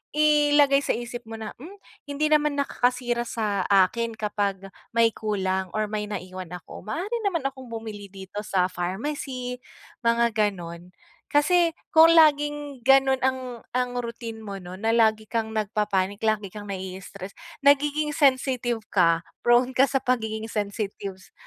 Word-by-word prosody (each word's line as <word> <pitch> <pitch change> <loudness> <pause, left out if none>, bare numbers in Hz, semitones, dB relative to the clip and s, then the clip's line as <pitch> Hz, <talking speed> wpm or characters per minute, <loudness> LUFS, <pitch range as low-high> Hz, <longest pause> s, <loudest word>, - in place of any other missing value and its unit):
ilagay 295 -2 +5
sa - - -1
isip 240 0 -6
mo 225 - -7
na, 220 -1 -6
"hmm, 340 +10 -10 0.3
hindi 300 +2 -1
naman 300 -1 +3
nakakasira 245 -3 0
sa 210 -5 -1
akin 215 +4 +2
kapag 200 -3 -2 0.2
may 230 -1 +5
kulang 190 -4 -2
or 215 -1 0
may 210 -1 -2
naiwan 185 -3 -6
ako 175 - -10
maaari 395 - -2
naman 335 -7 -1
akong 260 -2 -9
bumili 220 -3 -7
dito 195 +1 -8
sa 185 -3 +1
pharmacy," 250 +7 -4 0.5
mga 235 0 +3 0.2
gano'n. 175 -2 -8 0.4
Kasi 335 +3 +4 0.2
kung 325 +1 +7
laging 295 -4 +3
gano'n 270 0 +5
ang 260 0 +1 0.3
ang 250 -1 -1
routine 230 -1 -5
mo, 200 -3 -7
'no 180 +1 -9
na 225 +3 0
lagi 220 -2 +3
kang 225 0 -2
nagpapanic 205 -2 -1
lagi 215 -2 +1
kang 205 -1 -8
nai-stress 190 0 -7 0.3
nagiging 295 +1 +3
sensitive 255 -5 +1
ka, 170 -3 +3 0.2
prone 240 +2 +3
ka 265 +2 +4
sa 275 - +1
pagiging 220 -4 -1
sensitives, 200 -3 -5
230 Hz, 145 wpm, -25 LUFS, 200-270 Hz, 0.5 s, kung